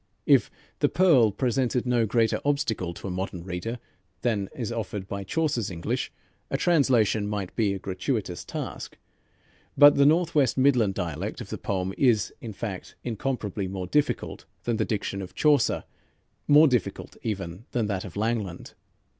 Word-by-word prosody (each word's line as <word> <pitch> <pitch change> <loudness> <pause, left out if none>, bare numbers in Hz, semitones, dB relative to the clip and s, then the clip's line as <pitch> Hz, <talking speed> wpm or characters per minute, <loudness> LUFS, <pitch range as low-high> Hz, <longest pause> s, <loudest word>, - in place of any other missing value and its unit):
If - - +5 0.3
"The - - +3
Pearl" 140 - +5
presented 125 +2 0
no 120 -2 +2
greater 115 +1 +1
obstacle 140 -11 0
to - - -7
a - - -3
modern 90 -1 -4
reader 95 +6 -4 0.5
than 105 -5 0
is 120 -3 -3
offered 105 -4 -4
by 100 0 -4
Chaucer's 135 - -1
English, 85 -3 -3 0.4
a - - 0
translation 125 - +3
might 100 -3 -4
be 110 -4 +2
a 100 - -2
gratuitous 95 0 -3
task, - - -6 0.8
but 145 0 +9
the 140 - +6
Northwest 155 -5 +3
Midland 125 -7 +3
dialect 90 - -3
of 115 -5 -8
the - - -3
poem 95 -1 -2
is, 120 -6 +3
in 115 - -6
fact, 100 -2 -6
incomparably 110 -5 -3
more 95 -1 -4
difficult 145 +10 -1 0.2
than 120 -2 0
the - - +1
diction 100 -2 -2
of 95 - -9
Chaucer, 145 -6 +3 0.6
more 150 +2 +7
difficult 125 -8 -1
even 95 -2 -4
than 120 -3 0
that 100 -3 -2
of 90 - -9
Langland. 105 -5 -2
110 Hz, 155 wpm, -26 LUFS, 95-125 Hz, 0.8 s, but